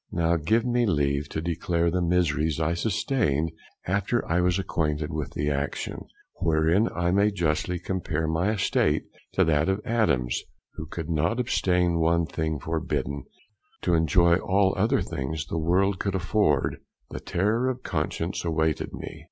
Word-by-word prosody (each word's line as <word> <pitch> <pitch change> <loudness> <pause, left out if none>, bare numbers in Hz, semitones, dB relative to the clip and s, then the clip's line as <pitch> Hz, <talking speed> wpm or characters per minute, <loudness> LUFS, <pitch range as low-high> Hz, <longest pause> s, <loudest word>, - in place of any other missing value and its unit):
Now 85 0 +1
give 110 +9 +1
me 120 -1 +2
leave 70 -4 0
to 80 - -4
declare 85 0 0
the 90 +1 0
miseries 80 -3 +1
I 80 +1 +1
sustained 85 - 0 0.3
after 100 +5 0
I 85 +2 +2
was 90 0 +2
acquainted 75 -4 -1
with 75 -2 -4
the 75 0 0
action, 70 0 -3 0.3
wherein 80 +7 +2
I 85 0 +1
may 100 +3 +4
justly 90 -2 -1
compare 85 -3 -2
my 80 +5 +1
estate 105 -3 +1 0.3
to - - +4
that 80 +1 +2
of 95 +1 +1
Adam's, 100 - +1 0.3
who 75 - -7
could 80 0 -6
not 85 +7 0
abstain 90 -7 +1
one 85 +1 +2
thing 80 -1 -2
forbidden, 75 -3 -3 0.6
to 90 - +2
enjoy 85 +1 +4
all 95 +1 +2
other - - +2
things 75 +3 -4
the 80 +2 -3
world 90 +4 +2
could 100 -1 -1
afford; 90 -5 +1 0.3
the - - -5
terror 110 +8 0
of 125 -1 -4
conscience 80 +2 -2
awaited 80 -2 0
me. - - -7
85 Hz, 155 wpm, -26 LUFS, 80-95 Hz, 0.6 s, may